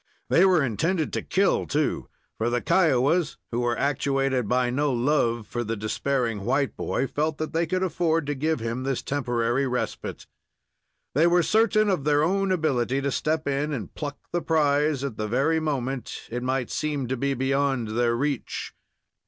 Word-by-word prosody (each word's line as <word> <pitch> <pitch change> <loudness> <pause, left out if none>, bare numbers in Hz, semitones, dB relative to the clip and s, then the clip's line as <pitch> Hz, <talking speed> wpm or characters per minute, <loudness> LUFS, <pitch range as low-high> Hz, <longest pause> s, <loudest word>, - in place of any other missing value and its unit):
They 180 - +6
were 180 -6 +4
intended 160 - 0
to - - -1
kill, 195 +1 +1
too, 150 0 -1 0.3
for 115 +2 +1
the 120 0 +1
Kiowas, 160 -1 +2
who 120 - -1
were 120 -1 0
actuated 135 -3 0
by 125 0 +2
no 145 +3 +1
love 120 -3 +1
for 120 +3 -3
the 115 0 -2
despairing 115 0 -1
white 140 +6 0
boy, - - -1
felt 150 +3 -1
that 155 0 -4
they 165 +1 +1
could 185 +3 0
afford 165 -3 +1
to 145 - -1
give 155 +2 -1
him 115 +2 -3
this 135 -1 -2
temporary 125 -1 0
respite. 125 -1 -4 0.9
They 155 +5 +4
were 175 0 +4
certain 215 +4 +3
of 185 -8 +1
their 145 0 +3
own 195 +3 +1
ability 135 -7 +1
to 140 0 -1
step 155 +3 -1
in 140 +2 0
and 115 -9 -5
pluck 145 -2 -5
the 175 - 0
prize 150 -3 +2
at 135 -6 -4
the 110 - -2
very 140 +8 +2
moment 135 -4 -3
it 120 +1 -3
might 130 -1 -1
seem 145 -4 -2
to 130 - -1
be 140 +2 -1
beyond 135 -2 0
their 115 +1 +1
reach. 140 0 -3
140 Hz, 175 wpm, -25 LUFS, 125-155 Hz, 0.9 s, They